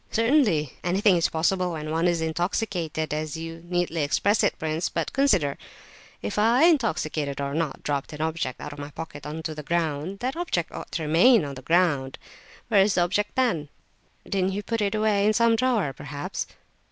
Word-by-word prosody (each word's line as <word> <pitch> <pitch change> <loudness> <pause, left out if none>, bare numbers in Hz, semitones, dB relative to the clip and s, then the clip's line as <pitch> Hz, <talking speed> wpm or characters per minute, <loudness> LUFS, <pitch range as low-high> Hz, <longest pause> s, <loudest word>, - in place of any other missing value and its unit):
"Certainly. 225 - +2
Anything 190 +2 +3
is 170 - +2
possible 180 +2 0
when 155 -1 -5
one 165 +2 +1
is 170 -2 +1
intoxicated, 165 -1 -2
as 155 0 -3
you 165 0 -7
neatly 175 -2 -1
express 200 +9 +2
it, - - +1
prince. 160 +1 -2
But - - -3
consider—if 185 - -2
I, 235 +6 +4
intoxicated 155 - +1
or 140 0 -2
not, 160 -2 -2
dropped 140 -2 -2
an 150 - -8
object 160 -5 -2
out 150 - -7
of 145 - -11
my 145 0 -6
pocket 150 -1 -8
on 160 +2 -5
to 160 - -3
the 150 - -7
ground, 165 +2 -2
that 255 +3 -2
object 325 - -2
ought - - -8
to 165 - -2
remain 170 - +5
on 140 - -5
the 130 - -9
ground. 145 -4 +1 0.5
Where 210 -4 +5
is 200 +1 +3
the 180 - +3
object, 200 +4 0
then?" 225 - +1 0.6
"Didn't 190 -1 0
you 205 +1 -3
put 230 +1 -2
it 200 0 0
away 215 -2 +2
in 215 +1 +4
some 230 +1 +4
drawer, 225 - +1
perhaps?" 145 +1 -5
170 Hz, 190 wpm, -25 LUFS, 150-210 Hz, 0.6 s, remain